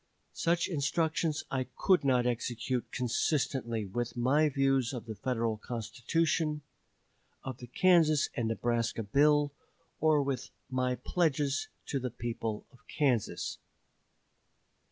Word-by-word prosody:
Such 170 Hz, +1 st, +1 dB
instructions 155 Hz, 0 st, 0 dB
I 130 Hz, -1 st, 0 dB
could 185 Hz, -5 st, +3 dB
not 125 Hz, -3 st, +3 dB
execute 125 Hz, +1 st, -2 dB
consistently 125 Hz, -3 st, 0 dB
with 120 Hz, +4 st, -3 dB
my 145 Hz, +6 st, +3 dB
views 135 Hz, -2 st, +1 dB
of 120 Hz, -4 st, -5 dB
the 110 Hz, -, -5 dB
Federal 115 Hz, 0 st, -1 dB
Constitution, 150 Hz, -, -1 dB, 0.8 s
of 130 Hz, -2 st, -6 dB
the 125 Hz, -, -9 dB
Kansas 160 Hz, +1 st, +4 dB
and 115 Hz, -4 st, 0 dB
Nebraska 115 Hz, 0 st, 0 dB
bill, 145 Hz, +6 st, +3 dB, 0.5 s
or 155 Hz, -2 st, +4 dB
with 135 Hz, -3 st, -3 dB, 0.2 s
my 125 Hz, 0 st, +1 dB
pledges 145 Hz, 0 st, 0 dB, 0.2 s
to 140 Hz, -, -2 dB
the 130 Hz, 0 st, -3 dB
people 115 Hz, -2 st, -4 dB
of 125 Hz, -, -19 dB
Kansas." 130 Hz, -8 st, 0 dB
130 Hz, 115 wpm, -31 LUFS, 120-150 Hz, 0.8 s, Kansas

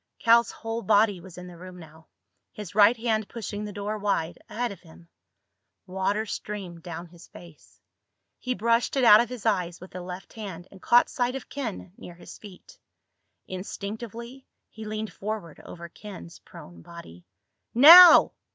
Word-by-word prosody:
Cal's 235 Hz, +1 st, +3 dB
whole 225 Hz, +1 st, -6 dB
body 205 Hz, -4 st, +2 dB
was 185 Hz, -1 st, -14 dB
in 180 Hz, -, -9 dB
the 175 Hz, -2 st, -13 dB
room 185 Hz, 0 st, -11 dB
now, 160 Hz, -1 st, -16 dB, 0.4 s
his 205 Hz, -4 st, -10 dB
right 210 Hz, +3 st, +5 dB
hand 220 Hz, -2 st, -2 dB
pushing 210 Hz, -2 st, -6 dB
the 210 Hz, -, -7 dB
door 205 Hz, +1 st, -5 dB
wide 185 Hz, -5 st, -2 dB
ahead 235 Hz, +2 st, -3 dB
of 195 Hz, -, -11 dB
him. 85 Hz, +1 st, -18 dB, 0.8 s
Water 190 Hz, +3 st, -2 dB
streamed 195 Hz, -5 st, -7 dB
down 170 Hz, -1 st, -8 dB
his 175 Hz, 0 st, -17 dB
face. 170 Hz, -3 st, -17 dB, 0.6 s
He 255 Hz, 0 st, -3 dB
brushed 230 Hz, +6 st, 0 dB
it 265 Hz, -, +1 dB
out 215 Hz, -2 st, +8 dB
of 240 Hz, -, -4 dB
his 250 Hz, -3 st, -9 dB
eyes 180 Hz, -5 st, -1 dB
with 185 Hz, -, -13 dB
the 180 Hz, -, -8 dB
left 180 Hz, +1 st, -10 dB
hand 190 Hz, -5 st, -9 dB
and 190 Hz, -, -16 dB
caught 240 Hz, +1 st, +4 dB
sight 250 Hz, 0 st, -2 dB
of 270 Hz, -, -8 dB
Ken, 225 Hz, -9 st, -7 dB
near 175 Hz, -, -12 dB
his 175 Hz, -, -13 dB
feet. 200 Hz, -4 st, -15 dB, 0.7 s
Instinctively 225 Hz, +6 st, -8 dB, 0.2 s
he 220 Hz, 0 st, -10 dB
leaned 215 Hz, 0 st, -6 dB
forward 205 Hz, -6 st, -7 dB
over 170 Hz, -1 st, -10 dB
Ken's 170 Hz, -, -12 dB
prone 85 Hz, -1 st, -14 dB
body. 90 Hz, -, -14 dB, 0.5 s
"Now!" 330 Hz, +7 st, +9 dB
205 Hz, 165 wpm, -25 LUFS, 175-225 Hz, 0.8 s, Now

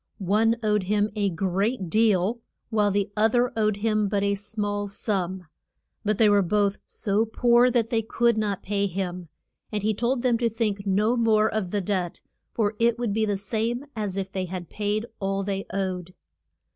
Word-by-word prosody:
One 215 Hz, +4 st, +2 dB
owed 210 Hz, -1 st, +2 dB
him 210 Hz, +2 st, +1 dB
a 205 Hz, -2 st, +1 dB
great 195 Hz, +4 st, -1 dB
deal, 215 Hz, +2 st, +2 dB, 0.3 s
while 210 Hz, -2 st, +3 dB
the 200 Hz, 0 st, 0 dB
oth 220 Hz, +2 st, +3 dB
er 245 Hz, 0 st, +2 dB
owed 215 Hz, -2 st, +1 dB
him 215 Hz, -1 st, +1 dB
but 200 Hz, 0 st, 0 dB
a 200 Hz, 0 st, +2 dB
small 205 Hz, 0 st, -3 dB
sum. 190 Hz, -3 st, -2 dB, 0.6 s
But 215 Hz, -1 st, 0 dB
they 220 Hz, -, +5 dB
were 205 Hz, -1 st, +5 dB
both 200 Hz, +2 st, +1 dB
so 205 Hz, +1 st, 0 dB
poor 240 Hz, +2 st, +4 dB
that 235 Hz, -2 st, 0 dB
they 225 Hz, -2 st, +2 dB
could 235 Hz, +1 st, +1 dB
not 210 Hz, -3 st, -1 dB
pay 200 Hz, 0 st, 0 dB
him, 180 Hz, -2 st, -4 dB, 0.4 s
and 210 Hz, -2 st, -2 dB
he 215 Hz, +1 st, +2 dB
told 240 Hz, +4 st, -1 dB
them 240 Hz, -3 st, +2 dB
to 235 Hz, -1 st, +2 dB
think 210 Hz, -3 st, -2 dB
no 210 Hz, +5 st, +2 dB
more 220 Hz, -2 st, +3 dB
of 215 Hz, -4 st, -1 dB
the 205 Hz, +2 st, -1 dB
debt, 185 Hz, -2 st, -2 dB, 0.3 s
for 215 Hz, -2 st, 0 dB
it 235 Hz, 0 st, +3 dB
would 235 Hz, -4 st, -1 dB
be 220 Hz, +1 st, +1 dB
the 205 Hz, -2 st, 0 dB
same 230 Hz, +6 st, -2 dB
as 205 Hz, -3 st, -3 dB
if 195 Hz, 0 st, -3 dB
they 190 Hz, -1 st, -2 dB
had 180 Hz, -1 st, -6 dB
paid 210 Hz, +1 st, -1 dB
all 195 Hz, 0 st, -1 dB
they 195 Hz, 0 st, -3 dB
owed. 185 Hz, -2 st, -3 dB
210 Hz, 190 wpm, -25 LUFS, 195-225 Hz, 0.6 s, they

